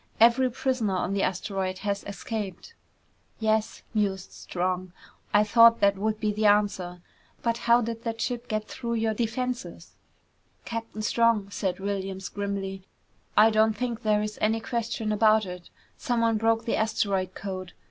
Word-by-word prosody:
Every 240 +3 +5
prisoner 245 -5 -1
on 185 +1 -1
the 200 - 0
asteroid 190 0 -2
has 200 -1 -1
escaped!" 205 - -5 0.7
"Yes," 220 -1 0
mused 195 -3 -1
Strong. 185 0 -3 0.4
"I 210 0 +5
thought 230 +2 +6
that 200 0 +4
would 215 +2 -1
be 215 -1 0
the 215 +1 +2
answer. 195 -4 +1 0.4
But 230 0 0
how 235 +1 +7
did 230 0 -4
that 225 -1 -3
ship 245 0 -2
get 215 -1 -2
through 235 -2 -4
your 225 -1 +1
defenses?" 245 +3 -3 0.7
"Captain 230 -2 -5
Strong," 220 -3 +2
said 185 -1 -2
Williams 195 -1 -3
grimly, 200 -1 -4 0.6
"I 220 +2 +7
don't 215 0 +3
think 235 -1 -3
there 210 -1 +2
is 210 0 -5
any 220 +1 +2
question 225 -1 -2
about 215 0 +4
it. 180 -1 -8 0.3
Someone 230 -2 +1
broke 225 +1 +1
the 230 - 0
asteroid 200 -4 0
code. 185 -2 -6
215 Hz, 150 wpm, -27 LUFS, 195-230 Hz, 0.7 s, how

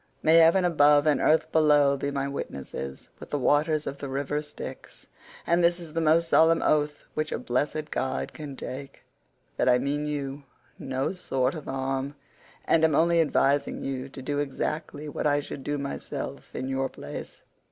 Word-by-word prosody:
May 160 +1 +6
heaven 165 +3 +6
above 145 -3 +5
and 150 -2 +3
earth 160 +1 +3
below 150 -3 +4
be 140 +1 -2
my 140 -1 -2
witnesses, 70 - -6
with - - -10
the 145 - -1
waters 150 +2 +2
of 140 - -5
the 140 - -5
river 140 +2 -2
Styx—and 170 +3 -5
this 170 +1 +3
is 165 -3 -10
the 165 - 0
most 165 +1 +3
solemn 165 0 +4
oath 150 -1 +1
which 155 0 -2
a - - -1
blessed 150 +4 -2
god 130 - -2
can 145 -3 -7
take—that 135 -1 -6
I 125 - +6
mean 145 +3 -1
you 140 -1 -4 0.4
no 135 +4 -2
sort 135 -8 -1
of 155 -4 -7
harm, 135 +1 -3 0.5
and 160 -1 +3
am 160 -2 +4
only 170 +1 +4
advising 145 -2 +1
you 135 0 -4
to 135 -1 -9
do 145 +1 -1
exactly 150 +1 -3
what 150 - -2
I 145 0 +3
should 140 -1 -7
do 145 +1 -2
myself 140 0 -6
in 130 - -3
your 135 0 -1
place. - - -9
145 Hz, 175 wpm, -27 LUFS, 135-155 Hz, 0.5 s, May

